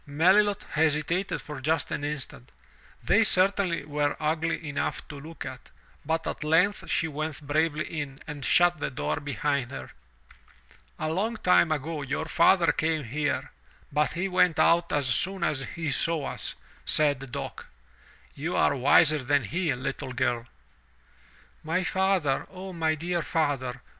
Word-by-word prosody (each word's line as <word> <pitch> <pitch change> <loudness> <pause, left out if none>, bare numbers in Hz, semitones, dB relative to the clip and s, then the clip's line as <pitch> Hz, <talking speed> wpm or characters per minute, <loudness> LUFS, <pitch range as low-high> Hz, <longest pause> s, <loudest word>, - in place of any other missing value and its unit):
'' - - -34
Melilot 190 +8 +3
hesitated 160 +4 0
for 150 -3 -8
just 155 +1 0
an 145 - -3
instant 145 - -5 0.3
— - - -28
they 225 - +4
certainly 185 -5 +3
were 145 -1 -1
ugly 160 +1 -1
enough 145 -1 -3
to 145 - -8
look 160 +3 -9
at - - -9 0.2
— - - -31
but 160 0 0
at - - -4
length 180 +7 +2
she 165 - +1
went 155 0 -5
bravely 155 +1 0
in 145 -4 -5
and 145 -3 -7
shut 175 +4 +4
the - - -2
door 125 - -2
behind 140 -1 -1
her. - - -8 1.1
"A 155 - -2
long 210 +7 -1
time 180 -4 +4
ago 155 +1 -2
your 140 +3 -3
father 170 +1 +4
came 160 -1 0
here, 145 +4 -2 0.4
but 150 +1 +1
he 175 +3 -1
went 180 -3 +3
out 170 0 +3
as 145 -2 +1
soon 175 +10 +1
as 150 -5 +1 0.2
he 160 -3 -2
saw 160 +2 0
us," - - -4 0.3
said 145 -4 +2
Dock. - - -6 0.7
"You 160 +5 -3
are 140 - +3
wiser 145 +3 +5
than 140 +1 +1
he, 165 - -1
little 130 0 -5
girl." 120 -1 -1 1.2
''My 165 +4 0
father, 190 -8 +1
O 190 0 -8
my 160 -2 0
dear 170 +2 -2
father!" 140 -7 -1
155 Hz, 160 wpm, -27 LUFS, 145-170 Hz, 1.2 s, wiser